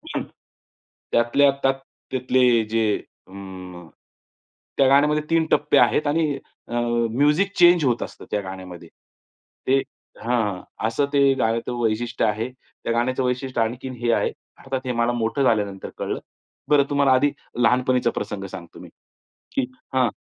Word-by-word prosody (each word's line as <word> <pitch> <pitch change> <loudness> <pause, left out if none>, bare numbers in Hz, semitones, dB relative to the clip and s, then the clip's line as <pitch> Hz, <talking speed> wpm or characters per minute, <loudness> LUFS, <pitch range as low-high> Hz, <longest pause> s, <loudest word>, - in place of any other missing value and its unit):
हं. - - -1 0.9
त्यातल्या 130 +4 +4
त्यात 135 - +4 0.4
त्यातले 125 -2 +3
जे 110 -2 +1 0.3
म 95 -3 -10 0.9
त्या 135 - +5
गाण्यामध्ये 150 +3 +4
3 165 -1 +3
टप्पे 150 - +3
आहेत 150 - +3
आणि 150 -1 +1 0.3
अ - - -8 0.4
म्युझिक 150 - +2
चेंज 175 -2 +6
होत 120 -2 +1
असतं - - -10
त्या 105 - 0
गाण्यामध्ये. 95 -3 -9 0.8
ते 135 +1 +4 0.4
हां. 110 -6 0 0.3
असं 115 +6 +1
ते 140 -1 +5
गाण्याचं 115 +2 0
वैशिष्ट्य 115 +2 0
आहे. 110 +4 -1 0.3
त्या - - -1
गाण्याचं 130 +3 0
वैशिष्ट्य 125 -1 -1
आणखीन 125 +3 -3
हे 120 -1 +2
आहे. - - +1 0.3
अर्थात 135 -1 -4
हे 125 - -1
मला 115 0 +1
मोठं 115 +3 0
झाल्यानंतर 105 -6 0
कळलं. - - -3 0.5
बरं 145 -1 +5
तुम्हाला 140 -2 +3
आधी 140 +3 +3 0.3
लहानपणीचा 125 0 +3
प्रसंग 100 -3 -4
सांगतो 85 -3 -10
मी. - - -11 0.7
की - - +3 0.3
हां, 130 -2 +3
125 Hz, 140 wpm, -23 LUFS, 110-140 Hz, 0.9 s, चेंज